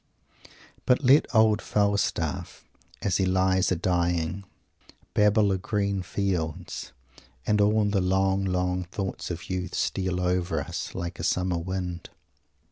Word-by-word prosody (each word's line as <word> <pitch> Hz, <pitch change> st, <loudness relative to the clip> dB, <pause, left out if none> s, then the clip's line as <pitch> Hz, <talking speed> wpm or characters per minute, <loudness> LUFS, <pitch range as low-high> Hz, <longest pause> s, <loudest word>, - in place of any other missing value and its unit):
But 125 Hz, +3 st, +3 dB
let 135 Hz, +4 st, +5 dB
old 110 Hz, -3 st, +4 dB
Falstaff, 100 Hz, -1 st, -1 dB, 0.4 s
as 90 Hz, -3 st, +1 dB
he 95 Hz, -, +1 dB
lies 95 Hz, 0 st, +2 dB
a' -, -, +3 dB
dying, 85 Hz, +1 st, 0 dB, 0.7 s
"babble 105 Hz, 0 st, +4 dB
o' 95 Hz, -, +1 dB
green 100 Hz, 0 st, -1 dB
fields," 90 Hz, -3 st, -3 dB, 0.5 s
and 105 Hz, -1 st, +2 dB
all 105 Hz, +1 st, +3 dB
the 100 Hz, -1 st, +1 dB
long, 95 Hz, +1 st, +1 dB
long 90 Hz, -1 st, -1 dB
thoughts 95 Hz, +2 st, -5 dB
of 85 Hz, -1 st, -6 dB
youth 90 Hz, 0 st, -3 dB
steal 95 Hz, -2 st, -1 dB
over 90 Hz, -2 st, 0 dB
us, 70 Hz, -, -5 dB
like 85 Hz, -2 st, -5 dB
a -, -, -4 dB
summer 90 Hz, 0 st, 0 dB
wind. 90 Hz, -1 st, -4 dB
95 Hz, 130 wpm, -26 LUFS, 90-100 Hz, 0.7 s, let